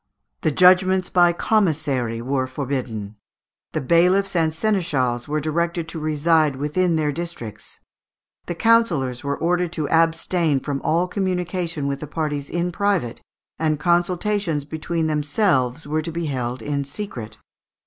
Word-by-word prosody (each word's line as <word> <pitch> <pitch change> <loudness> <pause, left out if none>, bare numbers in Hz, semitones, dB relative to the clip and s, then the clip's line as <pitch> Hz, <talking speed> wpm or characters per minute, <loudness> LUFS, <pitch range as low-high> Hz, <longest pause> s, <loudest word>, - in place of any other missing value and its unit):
The - - +2
judgments 185 +3 +4
by 175 -1 +5
commissary 145 - 0
were 130 0 -1
forbidden. 125 -6 -4 0.6
The 155 - -1
bailiffs 180 +7 +3
and 160 -2 +3
seneschals 155 - 0
were 150 +1 0
directed 170 +2 -1
to 165 - -5
reside 155 -1 +2
within 165 +5 0
their 150 -2 +1
districts. 155 -9 -7 0.7
The 175 - -3
councillors 170 - +2
were 140 0 -2
ordered 175 0 0
to 155 -4 -2
abstain 165 -2 +2
from 140 +1 -4
all 170 +3 +1
communication 180 -4 -2
with 140 0 -2
the 150 - -6
parties 150 -2 -3
in 175 +1 -1
private, 185 - -1 0.4
and 155 -2 +1
consultations 175 -2 0
between 160 +2 -2
themselves 150 - +1
were 155 +2 -1
to 165 +2 -5
be 170 +1 -3
held 125 -4 -3
in 140 +1 -1
secret. 140 - -6
160 Hz, 140 wpm, -22 LUFS, 140-175 Hz, 0.7 s, by